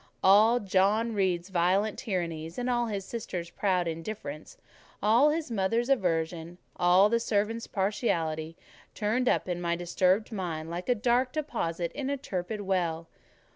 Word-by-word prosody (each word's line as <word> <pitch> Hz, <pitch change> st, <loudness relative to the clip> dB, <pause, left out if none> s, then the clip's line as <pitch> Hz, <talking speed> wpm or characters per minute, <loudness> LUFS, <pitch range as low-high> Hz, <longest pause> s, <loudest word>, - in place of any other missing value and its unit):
All 215 Hz, +5 st, +6 dB
John 205 Hz, +3 st, +2 dB
Reed's 185 Hz, -3 st, 0 dB
violent 190 Hz, +4 st, +1 dB
tyrannies, 165 Hz, -5 st, -3 dB
all 245 Hz, -1 st, 0 dB
his 200 Hz, -3 st, -4 dB
sisters' 180 Hz, -7 st, -5 dB
proud 185 Hz, -4 st, 0 dB
indifference, 165 Hz, -2 st, -6 dB, 0.5 s
all 235 Hz, +8 st, +5 dB
his 305 Hz, -3 st, -2 dB
mother's 230 Hz, +4 st, 0 dB
aversion, 170 Hz, -7 st, 0 dB, 0.2 s
all 180 Hz, +3 st, +5 dB
the 230 Hz, +2 st, +1 dB
servants' 225 Hz, +1 st, -1 dB
partiality, 165 Hz, -6 st, -1 dB, 0.4 s
turned 225 Hz, +4 st, +1 dB
up -, -, +1 dB
in 175 Hz, -1 st, -3 dB
my 170 Hz, -1 st, 0 dB
disturbed 185 Hz, +5 st, +1 dB
mind 165 Hz, -6 st, -4 dB
like 175 Hz, +6 st, -5 dB
a 245 Hz, -, +4 dB
dark 245 Hz, +3 st, +1 dB
deposit 180 Hz, -, -2 dB
in 275 Hz, -1 st, -4 dB
a 280 Hz, -, -1 dB
turbid 205 Hz, -4 st, -4 dB
well. 170 Hz, -4 st, -1 dB
195 Hz, 140 wpm, -28 LUFS, 170-230 Hz, 0.5 s, All